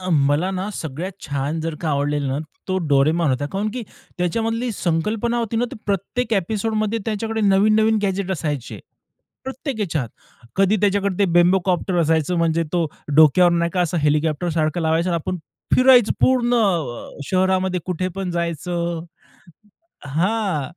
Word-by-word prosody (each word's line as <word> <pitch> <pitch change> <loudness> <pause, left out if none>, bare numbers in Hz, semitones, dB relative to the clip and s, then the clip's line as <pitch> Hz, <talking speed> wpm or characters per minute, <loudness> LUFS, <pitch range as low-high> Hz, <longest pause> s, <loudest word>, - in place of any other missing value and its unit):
अ, 185 - -5
मला 145 +4 +2
ना, 190 +1 -3
सगळ्यात 160 +5 -5
छान 145 +2 -2
जर 165 -1 -3
का 165 - -2
आवडलेलं 145 0 0
ना, 135 - -1 0.3
तो 185 - 0
डोरेमॉन 150 +3 +3
होता. 140 +2 -1
कारण 200 +2 -1
की 250 - -3 0.4
त्याच्यामधली 225 +7 -1
संकल्पना 210 +7 -1
होती 230 -1 -2
ना, 240 - +2
ती - - -6
प्रत्येक 205 +5 -2
ॲपिसोडमध्ये 215 +3 -1
त्याच्याकडे 225 +1 -2
नवीन-नवीन 215 +2 +3
गॅजेट 195 -1 -1
असायचे 150 -7 -4 0.7
प्रत्येक 265 0 -5
ह्याच्यात. 160 - -2 0.5
कधी 195 +2 +3
त्याच्याकडे 200 -1 +1
ते 200 - +4
बेम्बोकॉप्टर 180 +1 +2
असायचं, 160 +1 +1
म्हणजे 165 0 +2
तो 175 -2 +1 0.3
डोक्यावर 170 +3 +6
नाही 170 0 +1
का, 180 - +1
असं 175 0 0
हेलिकॉप्टरसारखं 155 +2 0
लावायचं 165 +3 +1
आणि - - 0
आपण 185 - -2 0.4
फिरायचं 255 -3 +6
पूर्ण 245 -2 +3 0.8
शहरामध्ये, 185 -1 +1
कुठे 185 0 -2
पण 190 -2 -3
जायचं. 170 0 -2 1.0
हां. 170 0 -1
180 Hz, 140 wpm, -21 LUFS, 160-210 Hz, 1.0 s, डोक्यावर